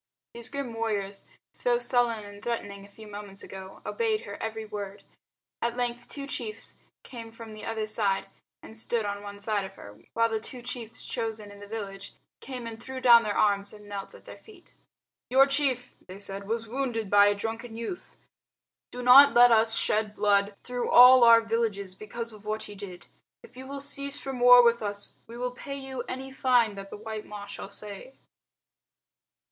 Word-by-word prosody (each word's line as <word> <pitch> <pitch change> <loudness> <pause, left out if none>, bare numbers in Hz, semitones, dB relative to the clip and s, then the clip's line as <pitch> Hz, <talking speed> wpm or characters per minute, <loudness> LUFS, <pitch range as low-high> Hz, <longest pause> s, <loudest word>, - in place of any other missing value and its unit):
These 235 -1 -7
grim 280 -4 -4
warriors, 205 -3 -3 0.3
so 245 -1 +1
sullen 240 -2 +1
and 205 0 -11
threatening 205 -4 -4
a 200 - -15
few 215 +2 -13
moments 205 -1 -9
ago, 190 0 -10
obeyed 445 -2 0
her - - -8
every 220 0 -4
word. 205 -2 -7 0.6
At 235 +1 -1
length 240 0 -3
two 280 -1 -6
chiefs 225 -5 -5 0.3
came 230 -3 -9
from 230 -1 -10
the 215 - -9
other 225 -1 -2
side 205 -3 0 0.4
and 220 - -12
stood 225 0 -2
on 200 0 -3
one 205 0 -9
side 205 -1 -1
of 190 - -9
her, 105 +1 -12 0.2
while 230 0 +4
the 225 -1 -2
two 245 +2 -11
chiefs 235 -2 -7
chosen 220 -2 -4
in 200 - -13
the 205 - -10
village 200 -2 -7 0.2
came 255 -3 -7
and 230 0 -7
threw 260 +1 -6
down 240 -2 +8
their 210 -2 -2
arms 200 -1 +2
and 210 -1 -13
knelt 200 -1 -7
at - - -16
their - - -11
feet. 415 -5 -18 0.6
"Your 265 +2 +6
chief," 275 -3 +1
they 185 +1 -9
said, 200 0 -5
"was 225 +1 -2
wounded 235 -3 -2
by 205 0 +7
a 205 - +3
drunken 225 +2 -5
youth. 235 +10 -6 0.7
Do 250 0 -6
not 275 +3 +9
let 245 0 +8
us 225 0 +4
shed 210 -1 +1
blood 200 0 +2
through 245 -1 -3
all 250 0 +9
our 230 -1 +8
villages 220 -4 -2
because 230 +3 -6
of 210 -1 -14
what 215 +1 -3
he 205 - -9
did. 190 -3 -9 0.4
If 245 - -16
you 260 +1 -9
will 280 +1 -6
cease 280 0 -4
from 265 -2 -5
war 245 0 +9
with 235 0 +3
us, 205 -1 -4
we 230 +1 -10
will 250 0 -2
pay 275 +2 -7
to 270 - -8
you 265 -2 -4
any 265 +1 -5
fine 250 -5 +3
that 195 0 -9
the - - -8
white 215 0 -7
Ma 205 -1 -7
shall 200 - -8
say." 205 +6 -10
225 Hz, 195 wpm, -28 LUFS, 205-245 Hz, 0.7 s, not